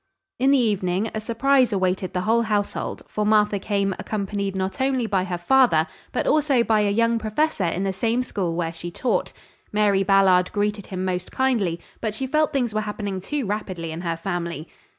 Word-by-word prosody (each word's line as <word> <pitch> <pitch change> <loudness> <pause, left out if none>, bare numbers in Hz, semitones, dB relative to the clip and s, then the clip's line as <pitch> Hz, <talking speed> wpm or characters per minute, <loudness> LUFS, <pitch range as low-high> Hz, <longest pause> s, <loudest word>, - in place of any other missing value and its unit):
In 265 +2 +3
the 280 - +5
evening 205 -3 0
a 215 - -2
surprise 245 +3 +2
awaited 185 -1 0
the 180 - 0
whole 225 +4 +2
household, 210 -3 -2
for 210 - -2
Martha 210 -1 +3
came, 200 -1 0
accompanied 200 -2 -3
not 190 +7 -2
only 260 -2 +1
by 195 -4 0
her 180 -2 -3
father, 175 -4 +4 0.3
but - - -1
also 285 -5 +3
by 220 -2 +2
a 205 - +2
young 230 +2 +2
professor 220 - 0
in 175 +3 -1
the 195 -1 -1
same 230 +5 0
school 180 -8 -2
where 165 -1 -2
she 170 +1 -6
taught. 190 0 -1 0.4
Mary 210 -2 +3
Ballard 195 -2 +4
greeted 205 -1 -1
him 185 -1 -4
most 180 -1 -3
kindly, 225 -11 0 0.2
but 215 -2 -2
she 265 - -3
felt 305 +3 +1
things 245 -5 0
were 215 - 0
happening 205 -3 -4
too 290 +5 -3
rapidly 185 -5 -4
in 160 +2 -5
her 170 -2 -2
family. 170 -3 -4
205 Hz, 190 wpm, -23 LUFS, 185-230 Hz, 0.4 s, the